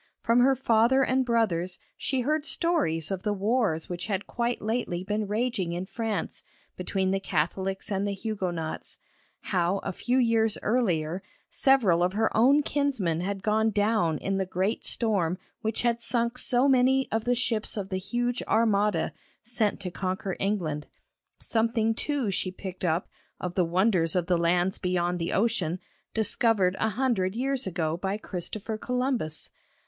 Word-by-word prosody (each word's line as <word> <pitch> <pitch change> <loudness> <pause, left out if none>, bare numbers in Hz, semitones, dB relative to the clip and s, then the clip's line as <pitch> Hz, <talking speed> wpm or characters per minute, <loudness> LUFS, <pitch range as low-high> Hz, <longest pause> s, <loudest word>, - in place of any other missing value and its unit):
From 230 +1 +3
her 265 +2 +5
father 245 +1 +3
and 260 0 +2
brothers 195 -8 0 0.2
she 265 -1 -1
heard 300 +4 0
stories 285 - 0
of 190 -2 -2
the 210 +1 0
wars 205 -5 +1
which 175 +1 -5
had 200 -2 -2
quite 240 0 -1
lately 215 -5 -2
been 210 +2 -2
raging 210 -4 -1
in 175 +2 -3
France 220 -3 -3 0.3
between 190 +1 -1
the 195 - +1
Catholics 190 +3 -2
and 195 +1 0
Huguenots; 190 -6 -4 0.4
how 180 0 +1
a 195 - -2
few 250 +7 0
years 225 -3 +3
earlier 185 -7 +1 0.3
several 225 -11 +4
of 180 +1 +2
her 220 +2 +1
own 275 +6 +5
kinsmen 260 - 0
had 195 +1 -3
gone 220 +1 +2
down 205 -6 +1
in 195 +4 -2
the 190 - 0
great 190 +4 -1
storm 190 -7 +1 0.2
which 220 +2 -1
had 235 -1 +1
sunk 235 0 +1
so 250 +2 +3
many 265 0 +4
of 225 0 -1
the 245 0 +2
ships 225 -3 -1
of 195 -2 -3
the 185 - -1
huge 240 +5 -1
Armada, 210 -2 +2 0.3
sent 225 -2 0
to 185 -2 -4
conquer 185 +1 -3
England. 170 -7 -1 0.5
Something, 225 0 +1
too, 265 -2 -1
she 185 - -1
picked 185 0 -8
up 170 0 +1 0.3
of 180 -1 -4
the 180 -2 +2
wonders 175 -1 +2
of 180 -2 +1
the 175 0 +2
lands 175 +2 +1
beyond 180 -1 0
the 165 - -2
ocean, 195 -6 +1 0.4
discovered 220 -3 +2
a 220 - +2
hundred 220 -5 0
years 265 -1 0
ago 165 -3 -1
by 195 +3 -2
Christopher 215 +3 -5
Columbus. 250 - -1
205 Hz, 160 wpm, -27 LUFS, 180-235 Hz, 0.5 s, her